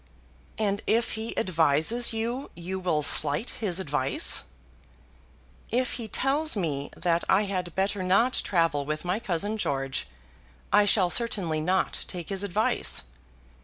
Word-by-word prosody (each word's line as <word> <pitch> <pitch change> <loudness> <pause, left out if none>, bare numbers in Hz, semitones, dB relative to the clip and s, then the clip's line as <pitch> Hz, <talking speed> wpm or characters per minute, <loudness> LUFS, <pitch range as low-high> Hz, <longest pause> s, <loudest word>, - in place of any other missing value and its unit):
"And 205 -1 -1
if 230 +1 +1
he 220 +1 -5
advises 165 +5 +2
you 235 +4 -3
you 180 +3 -5
will 170 -5 0
slight 150 - +3
his 195 -6 0
advice." 145 - +2 1.2
"If 250 +1 0
he 225 - -6
tells 275 +4 +2
me 145 -6 -2
that 170 -1 0
I 195 +2 +4
had 185 -4 -4
better 195 +1 -1
not 200 +8 +2
travel 165 -6 +1
with 155 +4 -4
my 180 +4 -1
cousin 205 0 -1
George 135 -5 -2 0.7
I 210 0 +6
shall 190 -3 +3
certainly 195 -9 +1
not 185 +4 -1
take 175 -3 -6
his 195 0 -1
advice. 205 - 0
190 Hz, 135 wpm, -26 LUFS, 165-220 Hz, 1.2 s, I